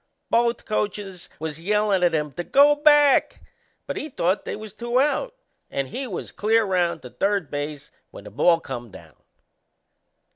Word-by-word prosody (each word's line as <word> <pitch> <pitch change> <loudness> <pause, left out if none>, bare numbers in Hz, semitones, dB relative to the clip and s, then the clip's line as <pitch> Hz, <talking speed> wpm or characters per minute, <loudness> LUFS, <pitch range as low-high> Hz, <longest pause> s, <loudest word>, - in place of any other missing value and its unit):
Both 235 0 +1
coachers 205 -4 -3
was 160 0 -6
yellin' 210 0 +1
at 175 -2 +3
him 150 -1 -1
to 175 - -4
go 285 +8 +5
back, 295 -1 +4 0.5
but - - -5
he 310 - -5
thought 185 - -1
they - - -4
was 215 -1 -9
two 240 +3 -1
out 450 - 0 0.3
and 135 -1 -3
he 265 - -5
was 195 - -6
clear 220 +1 +2
round 180 -3 0
to - - -10
third 195 -5 -1
base 145 0 -5 0.2
when - - -12
the - - -11
ball 165 - +3
come 120 -6 -7
down. 80 -6 -14
195 Hz, 170 wpm, -23 LUFS, 160-235 Hz, 0.5 s, go